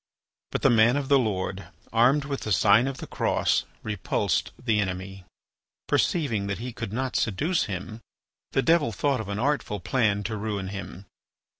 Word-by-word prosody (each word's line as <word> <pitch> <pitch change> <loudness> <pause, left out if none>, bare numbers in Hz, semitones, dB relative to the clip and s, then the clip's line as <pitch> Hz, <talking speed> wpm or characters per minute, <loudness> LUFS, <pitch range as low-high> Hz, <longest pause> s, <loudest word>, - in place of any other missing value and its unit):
But - - -3
the 135 - +6
man 115 +3 +5
of 140 -1 -3
the 140 -1 +6
Lord, 100 -4 -2 0.3
armed 130 +5 +4
with 140 -1 -3
the 105 - -4
sign 120 +6 +5
of 135 -1 -4
the - - -7
Cross, - - +1 0.2
repulsed 105 -4 -1
the 115 -4 0
enemy. 95 -1 -4 0.6
Perceiving 115 - +1
that 100 - -2
he 125 +2 -6
could 115 -3 -5
not 130 +3 -2
seduce 155 - +1
him, 105 +3 -6 0.5
the 135 - +2
devil 165 -6 +3
thought 130 +3 0
of 105 - -8
an 100 - -2
artful 130 -4 -1
plan 105 0 +1
to 110 +1 -3
ruin 100 -2 -3
him. 100 -1 -7
110 Hz, 170 wpm, -26 LUFS, 100-135 Hz, 0.6 s, the